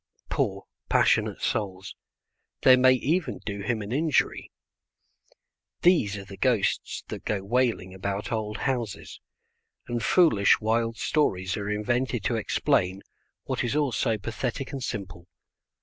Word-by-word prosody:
Poor, -, -, -1 dB, 0.2 s
passionate -, -, +2 dB
souls, 95 Hz, -2 st, -2 dB, 0.7 s
they 130 Hz, -, +8 dB
may 130 Hz, 0 st, +6 dB
even 155 Hz, +7 st, 0 dB
do 100 Hz, -1 st, -4 dB
him 110 Hz, +1 st, -1 dB
an 100 Hz, -, -7 dB
injury. 150 Hz, +2 st, 0 dB, 1.3 s
These 135 Hz, -, +4 dB
are 100 Hz, -, -8 dB
the 100 Hz, 0 st, -11 dB
ghosts 120 Hz, -7 st, 0 dB
that -, -, -6 dB
go 100 Hz, -2 st, -2 dB
wailing 115 Hz, -4 st, 0 dB
about 100 Hz, +2 st, -4 dB
old 110 Hz, -1 st, -2 dB
houses, 120 Hz, -6 st, -3 dB, 0.7 s
and 120 Hz, -1 st, -2 dB
foolish 110 Hz, -, +4 dB
wild 115 Hz, +1 st, 0 dB
stories 95 Hz, -11 st, 0 dB
are 100 Hz, 0 st, -4 dB
invented 120 Hz, +2 st, -1 dB
to 120 Hz, -, 0 dB
explain 95 Hz, -3 st, 0 dB, 0.4 s
what -, -, -2 dB
is 120 Hz, -, -1 dB
all 145 Hz, -3 st, +1 dB
so 115 Hz, -1 st, 0 dB
pathetic 120 Hz, +5 st, -4 dB
and 135 Hz, -2 st, -5 dB
simple. 95 Hz, -6 st, -6 dB
110 Hz, 135 wpm, -26 LUFS, 100-130 Hz, 1.3 s, they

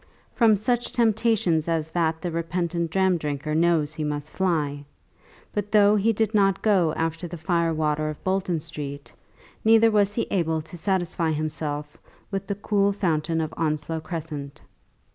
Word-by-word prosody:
From 225 Hz, -3 st, +5 dB
such 240 Hz, +4 st, -1 dB
temptation 220 Hz, -7 st, +2 dB
as 160 Hz, -2 st, -1 dB
that 160 Hz, -1 st, 0 dB
the 175 Hz, -, -2 dB
repentant 170 Hz, 0 st, -2 dB
dram 190 Hz, 0 st, +2 dB
drinker 150 Hz, 0 st, -3 dB
knows 160 Hz, -2 st, +2 dB
that 155 Hz, -, -12 dB
he 155 Hz, -, -2 dB
must 150 Hz, 0 st, -3 dB
fly. 150 Hz, -6 st, -1 dB, 0.7 s
But 205 Hz, -1 st, -3 dB
though 210 Hz, -1 st, +5 dB
he 210 Hz, +2 st, +3 dB
did 220 Hz, 0 st, 0 dB
not 195 Hz, -2 st, +2 dB
go 190 Hz, -7 st, +3 dB
after 165 Hz, +2 st, -2 dB
the 175 Hz, +1 st, -7 dB
fire 165 Hz, +1 st, +1 dB
water 155 Hz, -1 st, 0 dB
of 155 Hz, -, -8 dB
Bolton 185 Hz, -3 st, 0 dB
Street, 145 Hz, -3 st, -7 dB, 0.5 s
neither 225 Hz, 0 st, +6 dB
was 205 Hz, -1 st, +2 dB
he 230 Hz, -, 0 dB
able 160 Hz, -4 st, 0 dB
to 160 Hz, -, -11 dB
satisfy 175 Hz, -2 st, 0 dB
himself 150 Hz, -1 st, -3 dB, 0.3 s
with 195 Hz, -1 st, -3 dB
the 200 Hz, -, -2 dB
cool 200 Hz, 0 st, +1 dB
fountain 165 Hz, -4 st, 0 dB
of 155 Hz, 0 st, -4 dB
Onslow 155 Hz, 0 st, -1 dB
Crescent. 155 Hz, -4 st, -6 dB
170 Hz, 160 wpm, -25 LUFS, 155-195 Hz, 0.7 s, neither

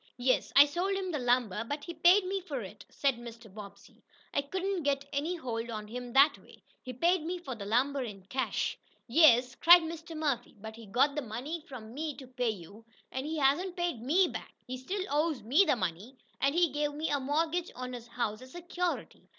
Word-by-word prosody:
"Yes, 255 Hz, +1 st, +1 dB
I 280 Hz, +1 st, +10 dB
sold 350 Hz, +7 st, -1 dB
him 380 Hz, -2 st, -2 dB
the 300 Hz, -, -2 dB
lumber, 245 Hz, -4 st, +1 dB
but 290 Hz, +5 st, -5 dB
he 340 Hz, -, -6 dB
paid 355 Hz, +4 st, +5 dB
me 385 Hz, +1 st, -2 dB
for 290 Hz, -8 st, -5 dB
it," 205 Hz, +1 st, -10 dB
said 275 Hz, -4 st, 0 dB
Mr. 230 Hz, -3 st, -11 dB
Bobbsey. 205 Hz, -2 st, -12 dB, 0.3 s
"I 280 Hz, -, +2 dB
couldn't 375 Hz, +5 st, -2 dB
get 280 Hz, -1 st, 0 dB
any 305 Hz, +6 st, -1 dB
hold 235 Hz, -7 st, -4 dB
on 215 Hz, -2 st, -5 dB
him 245 Hz, +2 st, -6 dB
that 280 Hz, +2 st, +5 dB
way. -, -, -19 dB, 0.2 s
He 255 Hz, -, -7 dB
paid 340 Hz, +8 st, +2 dB, 0.2 s
for 265 Hz, -, -4 dB
the 200 Hz, -4 st, -7 dB
lumber 265 Hz, +6 st, +1 dB
in 205 Hz, -6 st, -7 dB
cash." 260 Hz, +6 st, -2 dB, 0.3 s
"Yes," 250 Hz, -2 st, +5 dB
cried 345 Hz, +5 st, +7 dB
Mr. 325 Hz, 0 st, -7 dB
Murphy, 280 Hz, -6 st, -2 dB
"but 220 Hz, +2 st, -8 dB
he 225 Hz, -1 st, -12 dB
got 260 Hz, +8 st, +3 dB
the 295 Hz, -, -2 dB
money 265 Hz, +8 st, -5 dB
from 230 Hz, -4 st, -9 dB
me 300 Hz, +1 st, -4 dB
to 270 Hz, -, -9 dB
pay 250 Hz, -1 st, -2 dB
you, 205 Hz, +2 st, -8 dB, 0.3 s
and 260 Hz, +2 st, -4 dB
he 320 Hz, +1 st, -3 dB
hasn't 310 Hz, +7 st, +1 dB
paid 345 Hz, -9 st, -1 dB
ME 340 Hz, +10 st, +3 dB
back. -, -, -8 dB
He 255 Hz, -, -5 dB
still 370 Hz, +10 st, -4 dB
owes 300 Hz, -3 st, 0 dB
ME 285 Hz, -, +4 dB
the 295 Hz, -, +3 dB
money, 195 Hz, +5 st, -4 dB, 0.2 s
and 275 Hz, +2 st, +2 dB
he 345 Hz, -1 st, +4 dB
gave 295 Hz, +1 st, -1 dB
me 310 Hz, +1 st, -2 dB
a 285 Hz, -, +2 dB
mortgage 320 Hz, +5 st, 0 dB
on 255 Hz, 0 st, -6 dB
his 240 Hz, -1 st, -8 dB
house 230 Hz, -2 st, -3 dB
as 255 Hz, 0 st, -13 dB
security. 350 Hz, 0 st, -4 dB
275 Hz, 210 wpm, -31 LUFS, 235-325 Hz, 0.3 s, I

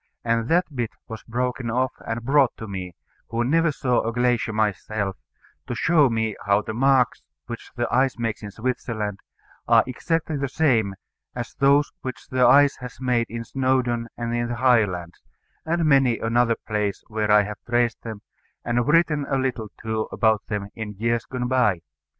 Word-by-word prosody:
And 115 Hz, -1 st, +1 dB
that 165 Hz, -3 st, +1 dB
bit 120 Hz, -3 st, -1 dB, 0.2 s
was 110 Hz, -1 st, -7 dB
broken 125 Hz, +1 st, -2 dB
off 130 Hz, +2 st, +1 dB, 0.2 s
and 115 Hz, +1 st, -3 dB
brought 140 Hz, -1 st, +3 dB
to 110 Hz, -, -7 dB
me, 90 Hz, -3 st, -6 dB, 0.3 s
who 115 Hz, +1 st, 0 dB
never 165 Hz, +5 st, +2 dB
saw 125 Hz, -3 st, +1 dB
a 115 Hz, -, -2 dB
glacier 120 Hz, -1 st, +1 dB
myself, 105 Hz, -2 st, -1 dB, 0.5 s
to 120 Hz, -, -3 dB
show 150 Hz, +2 st, +4 dB
me 110 Hz, -1 st, -1 dB
how 100 Hz, +1 st, +3 dB
the 110 Hz, -, -5 dB
marks 130 Hz, 0 st, +3 dB, 0.2 s
which 115 Hz, -, -8 dB
the 120 Hz, 0 st, -1 dB
ice 130 Hz, -1 st, +2 dB
makes 115 Hz, -2 st, -2 dB
in 105 Hz, -, -6 dB
Switzerland 110 Hz, -2 st, -3 dB, 0.5 s
are -, -, +6 dB
exactly 160 Hz, +4 st, -2 dB
the 140 Hz, -1 st, -2 dB
same 115 Hz, -10 st, +2 dB, 0.4 s
as 120 Hz, -2 st, -5 dB
those 140 Hz, +1 st, +3 dB
which 130 Hz, -2 st, -7 dB
the 130 Hz, -1 st, +2 dB
ice 145 Hz, 0 st, +6 dB
has 125 Hz, -1 st, -9 dB
made 125 Hz, -3 st, +1 dB
in 115 Hz, +1 st, -5 dB
Snowdon 125 Hz, -2 st, 0 dB
and 120 Hz, 0 st, -3 dB
in 120 Hz, 0 st, 0 dB
the 120 Hz, -, -3 dB
Highlands, 105 Hz, -9 st, +1 dB, 0.5 s
and 170 Hz, 0 st, +1 dB
many 135 Hz, -5 st, +4 dB
another 115 Hz, +1 st, +2 dB
place 105 Hz, -3 st, -3 dB
where 110 Hz, -1 st, -2 dB
I 105 Hz, 0 st, +6 dB
have 105 Hz, +1 st, -6 dB
traced 120 Hz, -1 st, +1 dB
them, 110 Hz, -3 st, -8 dB, 0.4 s
and 120 Hz, 0 st, 0 dB
written 150 Hz, -2 st, +3 dB
a 135 Hz, -, +1 dB
little, 130 Hz, -4 st, -2 dB
too, 110 Hz, 0 st, -2 dB
about 110 Hz, -2 st, +2 dB
them 100 Hz, -2 st, -3 dB
in 110 Hz, -2 st, -6 dB
years 115 Hz, +3 st, 0 dB
gone 125 Hz, -1 st, -3 dB
by. 120 Hz, -9 st, +2 dB
120 Hz, 175 wpm, -24 LUFS, 110-130 Hz, 0.5 s, are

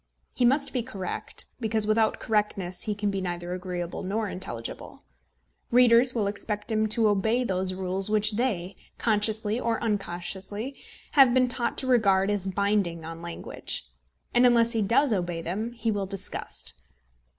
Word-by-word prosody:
He 245 Hz, -, +2 dB
must 280 Hz, +3 st, +2 dB
be 250 Hz, -, 0 dB
correct, 210 Hz, -6 st, -4 dB
because 220 Hz, -2 st, 0 dB
without 220 Hz, +1 st, +2 dB
correctness 200 Hz, -4 st, -1 dB
he 210 Hz, -, -2 dB
can 205 Hz, 0 st, -1 dB
be 195 Hz, -1 st, -2 dB
neither 175 Hz, -1 st, -4 dB
agreeable 180 Hz, -1 st, -4 dB
nor 210 Hz, +3 st, -2 dB
intelligible. 180 Hz, -13 st, -7 dB, 0.7 s
Readers 245 Hz, +1 st, +5 dB
will 220 Hz, -3 st, +1 dB
expect 210 Hz, +2 st, -3 dB
him 215 Hz, 0 st, +2 dB
to 220 Hz, +1 st, +3 dB
obey 220 Hz, +5 st, +2 dB
those 185 Hz, -3 st, 0 dB
rules 190 Hz, +1 st, +1 dB
which 215 Hz, 0 st, +2 dB
they, 205 Hz, -5 st, -1 dB, 0.2 s
consciously 215 Hz, 0 st, +1 dB
or 230 Hz, -2 st, 0 dB
unconsciously, 205 Hz, +3 st, -3 dB, 0.4 s
have 265 Hz, -4 st, +6 dB
been 255 Hz, -1 st, +4 dB
taught 240 Hz, -1 st, -2 dB
to -, -, -1 dB
regard 200 Hz, -5 st, +3 dB
as 200 Hz, -2 st, -1 dB
binding 190 Hz, -4 st, 0 dB
on 165 Hz, 0 st, -7 dB
language; 170 Hz, -, -5 dB, 0.4 s
and 245 Hz, +1 st, +6 dB
unless 235 Hz, -1 st, +4 dB
he 225 Hz, -2 st, +1 dB
does 230 Hz, +5 st, +3 dB
obey 175 Hz, -3 st, -2 dB
them, 195 Hz, +8 st, -3 dB
he 235 Hz, -1 st, -2 dB
will 200 Hz, -2 st, -2 dB
disgust. 185 Hz, -, -1 dB
210 Hz, 155 wpm, -27 LUFS, 185-230 Hz, 0.7 s, have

